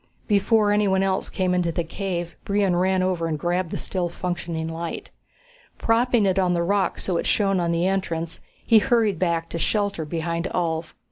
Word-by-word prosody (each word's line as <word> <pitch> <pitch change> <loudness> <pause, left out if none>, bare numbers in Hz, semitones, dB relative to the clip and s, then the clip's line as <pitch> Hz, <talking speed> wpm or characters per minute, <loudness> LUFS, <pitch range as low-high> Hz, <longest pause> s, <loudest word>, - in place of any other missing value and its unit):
Before 210 0 +3
anyone 200 -2 +2
else 190 0 0
came 185 -1 0
into 175 -2 +1
the 170 +1 -1
cave, 175 0 -4
Brion 200 -3 +1
ran 185 +1 +2
over 180 -3 0
and 155 -2 -1
grabbed 175 +2 -1
the - - -3
still 180 -2 -2
functioning 170 -2 -3
light. 165 +1 -5 0.7
Propping 230 -1 +2
it 190 0 +2
on 180 -2 +2
the 170 - +1
rocks 200 +2 0
so 180 -3 0
it - - -2
shone 195 -3 +2
on 170 -1 0
the 170 +1 +1
entrance, 170 -4 -2 0.2
he 225 -2 +6
hurried 215 -5 +2
back 170 -2 0
to 170 - -4
shelter 200 -3 0
beside 170 +2 -3
Ulv. 165 -2 -1
180 Hz, 185 wpm, -24 LUFS, 170-195 Hz, 0.7 s, he